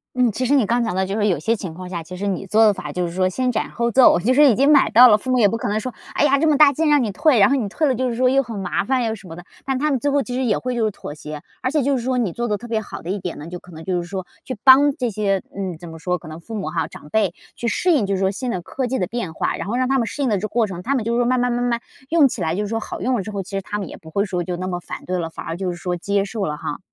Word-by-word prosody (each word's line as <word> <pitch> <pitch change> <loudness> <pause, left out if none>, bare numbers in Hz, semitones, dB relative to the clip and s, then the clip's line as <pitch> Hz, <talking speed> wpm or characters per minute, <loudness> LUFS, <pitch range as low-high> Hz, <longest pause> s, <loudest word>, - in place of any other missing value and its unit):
嗯， 250 -2 +3
其 255 +5 -2
实 280 +4 +3
你 265 -6 +4
刚 235 +4 +1
讲 220 -5 -2
到 190 0 +1
就 195 +1 -3
是 210 -1 +1
有 185 - +2
些 225 +1 0
情 190 -6 -6
况 185 +2 -8
下， 175 -2 -4
其 165 +3 -9
实 200 - -4
你 195 -1 -2
做 220 +4 +5
的 210 - +5
法， - - -7
就 180 -1 -2
是 170 - -7
说 185 +1 +1
先 255 +6 0
斩 - - -2
后 235 0 -1
奏， 255 -4 +6
就 235 +8 +2
是 290 +1 +6
已 230 - +4
经 275 +5 +4
买 280 -3 +5
到 245 +3 +8
了， 210 -3 +6
父 255 - -7
母 255 - +3
也 220 -4 +5
不 225 - -1
可 - - -3
能 210 +1 0
说， 255 +2 -5 0.2
哎 - - +3
呀， 280 -1 +3
这 320 - +2
么 300 -2 +3
大 290 -1 +7
劲 315 +3 +1
让 295 -3 +4
你 215 - -2
退， 300 - +3
然 200 - +6
后 275 - +3
你 230 -7 -1
退 310 +9 0
了 265 - +2
就 255 +1 -1
是 235 - -3
说， 255 +2 +2
又 270 +2 +4
很 235 -5 -7
麻 185 -2 -1
烦 255 +4 0
又 225 -1 -1
什 210 -3 -11
么 165 - -8
的。 175 - -10 0.2
但 270 -1 0
他 300 +3 0
们 265 - +1
最 290 - 0
后 285 0 +2
其 250 - -6
实 260 +1 -1
也 225 -5 +1
会 255 0 -3
就 235 -2 0
是 215 - +2
妥 170 - -8
协。 150 0 -8 0.2
而 255 - 0
且 295 0 +1
就 275 +1 +1
是 240 - -4
说 255 +1 0
你 225 -7 0
做 240 +1 -2
得 210 -2 0
特 240 - -10
别 225 -2 -1
好 215 - -8
的 170 - -7
一 200 - -2
点 180 -2 -5
呢， 150 - -8
就 175 +1 -7
可 180 - -16
能 160 -1 -10
就 180 0 -1
是 170 - -8
说 190 -1 -4 0.2
去 255 - -6
帮 280 +2 +7
这 245 -3 -2
些 195 -2 0
嗯， 190 -4 -4
怎 175 +2 -11
么 160 0 -10
说， 180 +2 -1
可 155 - -13
能 155 +1 -8
父 225 +7 -8
母 200 - -3
哈 165 -2 -1
长 150 - -13
辈， 200 0 +1 0.2
去 240 - -4
适 355 +9 +1
应 280 -11 +3
就 200 - 0
是 - - -2
说 190 0 +2
新 245 +5 -4
的 185 -6 -2
科 260 +6 -3
技 260 +2 -1
的 185 - 0
变 225 -7 -4
化。 - - -1
然 - - -5
后 220 - -2
让 255 +1 +1
他 270 0 +2
们 230 - 0
适 285 - -3
应 260 - +1
的 210 - +2
这 - - -5
个 215 - -2
过 225 +2 +1
程， 185 -4 -6
他 275 +9 -1
们 250 - 0
就 230 +1 0
说 240 0 +2
慢 255 +1 +2
慢 245 0 +1
慢 245 0 -1
慢 240 -1 0 0.3
用 320 -4 +5
起 235 - -5
来 160 -1 0
就 205 - -1
是 - - -3
说 225 +1 -1
好 - - -7
用 255 0 +1
了 225 - -1
之 195 - -7
后， 200 -1 -3
其 190 - -13
实 195 0 -2
他 205 - -4
们 200 - -4
也 - - -9
不 160 - -14
会 200 +5 0
说 180 -3 -2
就 175 0 -4
那 185 - -4
么 175 -1 -3
反 - - -8
对 180 0 -2
了， 165 -1 -3
反 - - -9
而 165 - -4
就 185 0 -2
是 175 - -7
说 180 0 -3
接 200 +3 0
受 205 -1 -3
了 150 0 -3
哈。 150 - -5
220 Hz, 405 characters per minute, -21 LUFS, 185-255 Hz, 0.3 s, 到